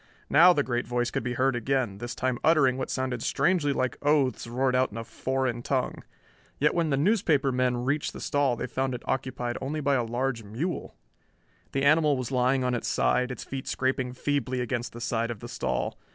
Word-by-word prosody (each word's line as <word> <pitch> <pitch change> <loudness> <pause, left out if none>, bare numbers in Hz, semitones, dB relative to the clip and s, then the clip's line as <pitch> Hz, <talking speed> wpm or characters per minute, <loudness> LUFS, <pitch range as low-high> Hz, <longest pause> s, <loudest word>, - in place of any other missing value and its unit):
Now 170 +5 +8
the 150 -5 +2
great 120 -3 -2
voice 120 0 0
could 135 - -1
be 120 +1 -3
heard 130 +1 +2
again, 120 -4 -1
this 120 +1 -5
time 130 -1 -1
uttering 145 -6 +4
what 130 - -4
sounded 130 -2 -2
strangely 150 +2 +1
like 130 -2 -1
oaths 140 -5 +2
roared 125 +2 0
out 130 0 +3
in 110 - -8
a 115 - -4
foreign 130 0 -2
tongue. - - -2 0.5
Yet 150 +2 +2
when 170 -2 +1
the 135 - +1
newspaper 155 -5 +2
men 125 -1 0
reached 145 +3 0
the - - -9
stall 140 -3 +1
they - - -4
found 130 -1 -2
it 120 - -8
occupied 125 -2 -2
only 150 +3 -3
by 140 -1 +1
a 125 -3 +2
large 120 +1 -2
mule. 125 - -4 0.8
The 135 - -1
animal 150 0 +4
was 130 0 -4
lying 130 +1 +2
on 125 0 0
its 120 - -2
side, 125 - +1
its 125 - -6
feet 135 -1 -6
scraping 130 -1 -1
feebly 130 -1 -1
against 120 0 -2
the 120 - -9
side 115 0 -1
of 115 -3 -5
the 120 - -8
stall. - - -2
130 Hz, 210 wpm, -27 LUFS, 120-140 Hz, 0.8 s, Now